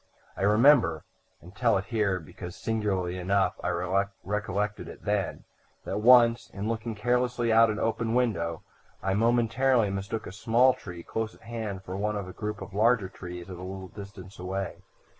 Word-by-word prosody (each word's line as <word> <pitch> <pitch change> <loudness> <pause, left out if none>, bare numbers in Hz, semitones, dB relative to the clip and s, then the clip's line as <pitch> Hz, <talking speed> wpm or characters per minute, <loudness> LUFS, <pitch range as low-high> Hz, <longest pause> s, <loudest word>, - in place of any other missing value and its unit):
I - - -7
remember 115 +7 +5 0.4
and 90 +3 -14
tell 115 -2 +3
it 95 - -3
here 105 -5 0
because, 90 +2 -9
singularly 95 -5 -1
enough, 95 0 +2
I 90 - 0 0.5
recollected 105 +1 -2
it - - -11
then 105 -2 -1 0.4
that - - -2
once, 120 0 +6
in 100 +1 -5
looking 115 0 -3
carelessly 120 +1 +1
out 115 0 +6
of 105 - -1
an - - -2
open 115 0 0
window, 85 -10 0 0.4
I 95 - +1
momentarily 115 +1 +3
mistook 100 +3 -4
a - - -7
small 115 +5 +4
tree 90 -8 -9
close 110 -1 -3
at - - -22
hand 110 -5 -5
for 95 0 -6
one 105 +2 -1
of 100 -3 -4
a 90 - -8
group 105 +2 -4
of - - -11
larger 105 -1 +3
trees 90 -2 -8
at 90 -2 -8
a - - -9
little 95 0 -7
distance 100 -2 -11
away. 95 +1 -3
105 Hz, 180 wpm, -28 LUFS, 95-115 Hz, 0.5 s, once